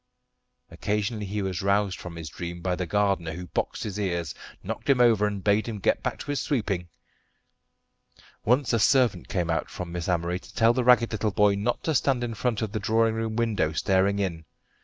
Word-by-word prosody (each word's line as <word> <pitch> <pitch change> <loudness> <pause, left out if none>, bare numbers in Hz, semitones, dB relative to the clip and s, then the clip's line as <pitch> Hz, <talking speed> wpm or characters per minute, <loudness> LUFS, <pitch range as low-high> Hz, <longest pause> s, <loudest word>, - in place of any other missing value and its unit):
Occasionally 105 0 -2
he 100 +1 -2
was 95 0 -2
roused 100 0 +1
from 90 -1 -8
his 80 -2 -7
dream 85 +3 -6
by 90 0 0
the 90 -1 -3
gardener, 95 -3 +1
who 90 +2 -6
boxed 85 - -3
his 105 -1 -4
ears, 85 -6 -2 0.3
knocked - - -5
him 135 -2 +4
over, 115 -4 +5
and 100 -2 -4
bade 105 +2 +2
him 115 -2 -4
get 95 - +1
back - - -2
to - - -4
his 145 - -1
sweeping. 100 - -1 1.5
Once 125 +2 +2
a 115 - +3
servant 125 +1 +3
came 85 -3 -1
out 80 - -1
from 90 -2 -6
Miss 85 +1 -4
Amory 90 0 0
to - - -16
tell 115 +1 +4
the 125 0 0
ragged 125 -1 +5
little 110 0 0
boy 105 0 +3
not 105 +5 -1
to 160 - 0
stand 130 -2 +1
in 120 -1 -3
front 115 0 -1
of 110 - -3
the 110 - -2
drawing 115 +1 +2
room 110 -1 -2
window 110 -9 0
staring 95 +4 +2
in. 90 -5 -2
105 Hz, 205 wpm, -26 LUFS, 90-115 Hz, 1.5 s, over